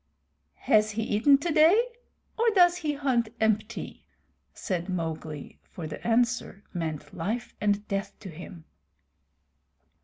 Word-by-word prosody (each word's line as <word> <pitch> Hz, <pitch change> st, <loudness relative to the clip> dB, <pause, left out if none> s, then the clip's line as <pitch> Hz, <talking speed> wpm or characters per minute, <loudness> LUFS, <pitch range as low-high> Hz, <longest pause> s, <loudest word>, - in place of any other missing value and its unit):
"Has 215 Hz, 0 st, +4 dB
he 220 Hz, +1 st, -2 dB
eaten 225 Hz, +7 st, +4 dB
today, 320 Hz, +6 st, +4 dB, 0.6 s
or 460 Hz, +1 st, +3 dB
does 355 Hz, -1 st, +6 dB
he 310 Hz, -4 st, -1 dB
hunt 260 Hz, -5 st, 0 dB
empty?" 220 Hz, -1 st, -1 dB, 0.5 s
said 180 Hz, -2 st, -4 dB
Mowgli, 160 Hz, -4 st, -5 dB
for 170 Hz, -, -9 dB
the 155 Hz, -1 st, -7 dB
answer 235 Hz, -3 st, +1 dB
meant 155 Hz, -4 st, -4 dB
life 215 Hz, +8 st, -3 dB
and 205 Hz, 0 st, +1 dB
death 195 Hz, 0 st, -3 dB
to 195 Hz, -, -8 dB
him. 170 Hz, 0 st, -10 dB
210 Hz, 120 wpm, -27 LUFS, 175-270 Hz, 0.6 s, does